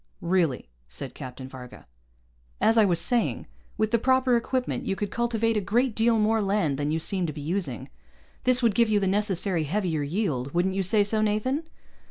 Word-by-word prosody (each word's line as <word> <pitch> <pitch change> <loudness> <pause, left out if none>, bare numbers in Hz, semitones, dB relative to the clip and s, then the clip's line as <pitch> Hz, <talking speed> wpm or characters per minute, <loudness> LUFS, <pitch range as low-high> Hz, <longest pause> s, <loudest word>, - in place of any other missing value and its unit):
"Really," 170 -7 0 0.2
said 130 - -6
Captain 130 -1 -8
Varga. 130 -2 -11 0.7
"As 225 - +3
I 220 -2 +5
was 175 -4 +2
saying, 245 -2 0 0.3
with 215 0 0
the 235 - +3
proper 260 0 +3
equipment, 250 +2 -2
you 195 - 0
could 205 0 -4
cultivate 230 -1 0
a 210 - +1
great 230 +5 +1
deal 225 +1 +2
more 220 +1 +2
land 195 -9 0
than 145 0 -1
you 155 - 0
seem 180 +2 -1
to 155 - -4
be 150 - -8
using. 155 - -2 0.6
This 255 0 +4
would 230 -3 +3
give 230 +2 +3
you 210 -1 +3
the 195 - -1
necessary 190 -4 0
heavier 170 -2 -1
yield. 145 - -2
Wouldn't 185 +2 +1
you 195 - 0
say 205 +3 +4
so, 215 +1 0
Nathan?" 255 +9 -1
200 Hz, 195 wpm, -26 LUFS, 165-225 Hz, 0.7 s, I